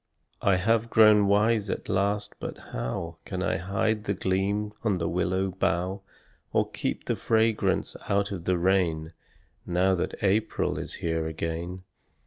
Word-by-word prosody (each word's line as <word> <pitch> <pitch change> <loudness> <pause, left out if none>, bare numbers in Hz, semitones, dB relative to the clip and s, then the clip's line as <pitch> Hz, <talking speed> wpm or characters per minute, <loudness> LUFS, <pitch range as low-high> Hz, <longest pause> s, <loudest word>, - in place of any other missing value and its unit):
I 100 - +4
have 115 +5 +1
grown 105 -2 +6
wise 105 +1 +3
at - - -3
last 100 +2 0
but - - -5 0.2
how 80 +8 -3
Can 95 -1 -4
I - - +1
hide 100 +4 -1
the 100 - 0
gleam 100 +3 0
on 105 -5 +1
the 85 -1 -1
willow 95 +2 0
bough, 95 +1 -1 0.5
Or - - +2
keep - - -3
the - - 0
fragrance 110 -1 +1
out 100 0 +1
of 90 -4 -5
the 90 -1 +2
rain 85 -3 +1 0.5
Now 90 +2 +2
that 90 - -1
April 105 +2 +1
is - - -5
here 80 -1 0
again? 85 +3 -4
95 Hz, 150 wpm, -27 LUFS, 90-105 Hz, 0.5 s, grown